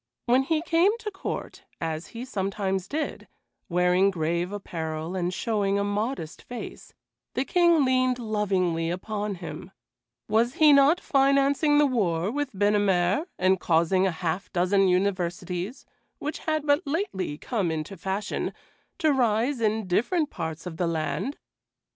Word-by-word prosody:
When 250 +2 +4
he 310 +3 0
came 345 +6 +3
to 440 -2 -6
court, 390 0 -5 0.2
as 160 0 -3
he 235 +2 -7
sometimes 195 -4 -2
did, 305 +5 -4 0.4
wearing 180 +2 +3
grave 170 0 -1
apparel 165 -4 -4
and 180 -1 -1
showing 200 0 0
a 200 - +1
modest 205 - -3
face, 245 -1 -9 0.4
the 260 - 0
King 340 -4 +4
leaned 255 -1 +2
lovingly 190 -7 0
upon 205 +3 -3
him; 180 - -8 0.6
was 235 +4 +2
he 305 -2 +6
not 280 +5 +5
financing 275 +2 +3
the 295 - +6
war 195 - 0
with 290 +1 -2
Binnamere 205 - +2
and 185 0 +3
causing 175 +3 +2
a - - 0
half 170 +2 -3
dozen 190 +2 +3
universities, 180 +3 -1 0.3
which 300 +2 -4
had 310 -1 0
but 290 +2 +3
lately 275 - -2
come 200 -1 -1
into 160 +4 -4
fashion, 195 +3 -3 0.4
to 315 -5 +3
rise 240 +1 +1
in 220 -1 +1
different 285 - +1
parts 160 +1 -5
of 170 -3 -6
the 175 - 0
land? 165 - -2
205 Hz, 140 wpm, -26 LUFS, 180-270 Hz, 0.6 s, he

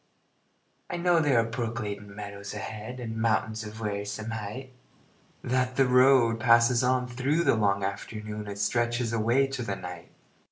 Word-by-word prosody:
I - - -3
know 175 -1 +3
there 145 -6 +3
are - - +3
brook 115 0 -3
gladdened 105 -3 -5
meadows 100 -1 -7
ahead, 110 +4 -6
And 110 -2 -5
mountains 110 0 0
of 110 +1 -9
wearisome 105 +1 -4
height; 110 +5 -6 0.7
That 125 0 0
the 135 - +4
road 125 -2 +5
passes 115 +1 +4
on 125 0 +1
through 135 +7 0
the - - +4
long 100 -3 +1
afternoon 105 +2 -5
And 100 0 -6
stretches 120 +2 0
away 115 +5 +3
to 135 -2 -4
the 100 -4 -2
night. 90 -2 -8
115 Hz, 160 wpm, -28 LUFS, 105-125 Hz, 0.7 s, road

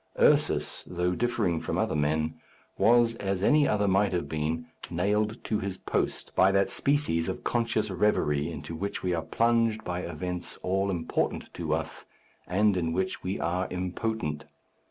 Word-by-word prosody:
Ursus, - - +3
though 90 0 0
differing 115 -7 0
from - - -3
other - - 0
men, 80 +1 +1 0.4
was, 120 0 +4
as 95 -2 -2
any 150 +5 +5
other 105 -1 +2
might 100 +1 +3
have 85 - -1
been, 80 +1 -2 0.2
nailed 105 +6 0
to 110 - -1
his 95 -1 -4
post - - -2
by 95 +1 +5
that 100 +3 +2
species 120 - +1
of 95 - -5
conscious 115 -3 0
reverie 80 -6 +1
into 85 - -7
which 100 +5 -4
we 90 -1 +1
are 85 - 0
plunged 115 +6 +1
by 90 0 -3
events 90 +1 -5
all 95 +2 +1
important 85 -4 -2
to - - -4
us, - - -2 0.4
and 100 +2 +3
in 80 -2 0
which 95 +1 -1
we 95 +2 -3
are 90 +3 0
impotent. 90 -3 -3
95 Hz, 160 wpm, -28 LUFS, 85-105 Hz, 0.4 s, any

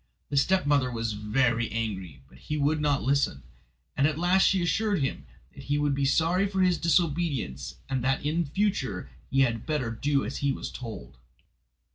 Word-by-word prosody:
The 140 - 0
stepmother 145 -5 +3
was 115 -2 -2
very 115 +2 +1
angry, 100 -8 -4
but - - -18
he 150 - -4
would 150 +1 +1
not 145 -2 +1
listen, 135 - +1 0.5
and 140 - +3
at 155 -1 -2
last 180 +3 +4
she 190 -2 +2
assured 210 +3 +1
him 70 - -3 0.3
that - - -11
he 145 0 0
would 145 -1 +1
be 140 0 0
sorry 170 +7 +2
for 190 -1 -1
his 180 -2 +2
disobedience, 145 - 0
and 130 -2 -2
that 135 +2 0
in 165 +3 +1
future 140 - -1 0.2
he 135 - +2
had 115 -4 0
better 145 -7 -1
do 140 +5 0
as 135 - -4
he 140 -1 +1
was - - -5
told. 65 - -8
140 Hz, 180 wpm, -27 LUFS, 115-165 Hz, 0.5 s, last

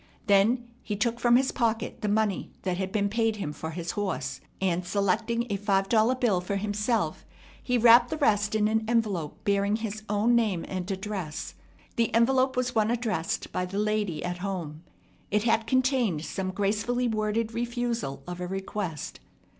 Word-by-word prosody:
Then 220 +5 +3
he 210 - -3
took 235 +3 0
from 240 -1 +4
his 260 +1 +3
pocket 230 -2 -1
the 210 - -1
money 210 -1 0
that 185 -2 -1
had 190 0 -2
been 200 -1 +1
paid 225 +1 +1
him 170 -8 -4
for 160 - -6
his 170 +1 -4
horse; 205 -2 -3 0.2
and, 180 -2 0
selecting 215 +5 0
a 200 - 0
five 195 -1 +1
dollar 230 +2 +4
bill 225 -8 +1
for 190 +3 -3
himself, 210 +3 -1 0.4
he 250 -1 +1
wrapped 240 +1 +7
the 315 - -2
rest 210 -7 +2
in 210 -1 +3
an 220 +1 +1
envelope 210 -10 -1
bearing 200 +1 +2
his 215 -1 -4
own 210 +3 +2
name 210 -8 +1
and 185 0 -4
address. 190 -5 -4 0.4
The 230 -1 +2
envelope 260 +2 +3
was 250 0 0
one 220 -1 +2
addressed 225 -5 -1
by 180 - -2
the 195 +2 -5
lady 210 -5 0
at 175 0 -3
home. 175 -6 -4 0.5
It 210 0 +1
had 225 -1 +2
contained 250 - +1
some 190 -1 -3
gracefully 210 +6 0
worded 220 0 -1
refusal 235 - -2
of 180 0 -6
a 180 - -3
request. 190 -4 -4
210 Hz, 175 wpm, -27 LUFS, 190-235 Hz, 0.5 s, wrapped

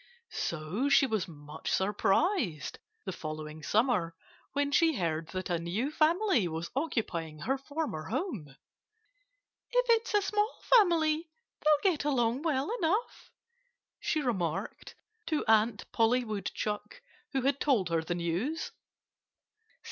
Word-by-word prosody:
So 170 - -2
she 275 - +6
was 215 -7 -1
much 150 -1 -8
surprised, 200 - +1 0.3
the 190 - -2
following 155 -2 -6
summer, 205 - +1 0.4
when 285 0 0
she 325 0 +4
heard 165 -5 -1
that 185 +1 -4
a 170 - +1
new 195 - -2
family 315 - +3
was 165 +1 -4
occupying 200 - -2
her 235 - 0
former 275 - -4
home. 230 - -3 1.2
"If - - +2
it's 460 -1 +2
a 410 - +4
small 420 +2 0 0.2
family 330 -6 +4 0.3
they'll 305 +5 +4
get 310 - -3
along 250 -3 +1
well 305 - 0
enough," 385 +8 -1 0.7
she 310 - 0
remarked 185 - -2 0.3
to 310 -2 0
Aunt 220 -1 +3
Polly 240 +2 +3
Woodchuck, 210 -1 -4 0.3
who 265 -2 0
had 275 +1 +2
told 230 - +2
her 165 -1 +1
the 175 +2 -3
news. 175 - -2
235 Hz, 125 wpm, -30 LUFS, -, 1.2 s, she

